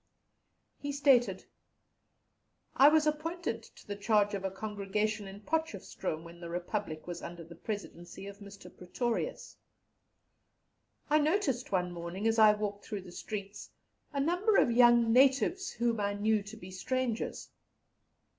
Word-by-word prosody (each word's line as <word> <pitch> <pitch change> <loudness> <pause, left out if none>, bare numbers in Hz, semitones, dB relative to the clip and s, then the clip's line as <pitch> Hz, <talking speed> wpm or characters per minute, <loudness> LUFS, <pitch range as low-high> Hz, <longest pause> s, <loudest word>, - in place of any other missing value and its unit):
He 285 - -3
stated: 275 -4 +3 1.3
"I 280 +2 +8
was 310 0 +4
appointed 305 -4 -2
to - - -17
the 205 - -5
charge 205 0 +2
of 195 -1 -3
a 190 - 0
congregation 210 +1 -2
in 195 +1 -10
Potchefstroom 205 - -3
when 170 0 -12
the 170 -1 -7
Republic 175 -1 -4
was 175 -1 -6
under 170 0 -7
the 165 +1 -12
Presidency 175 -1 -7
of 200 0 -9
Mr. 200 -1 -12
Pretorius. 240 - -3 1.5
I 305 +1 +4
noticed 300 - 0
one 180 -2 +1
morning, 175 +4 -5
as 225 0 +2
I 215 -1 +8
walked 205 -1 -4
through 205 -3 -5
the 180 -1 -12
streets, 200 +1 -6 0.4
a 280 - -2
number 360 +9 +2
of - - +4
young 240 -1 +6
natives 270 - +4
whom 235 -1 -1
I 200 0 0
knew 215 +1 +2
to 210 +2 -10
be 185 -3 -10
strangers. 240 +4 -2
215 Hz, 145 wpm, -31 LUFS, 195-255 Hz, 1.5 s, I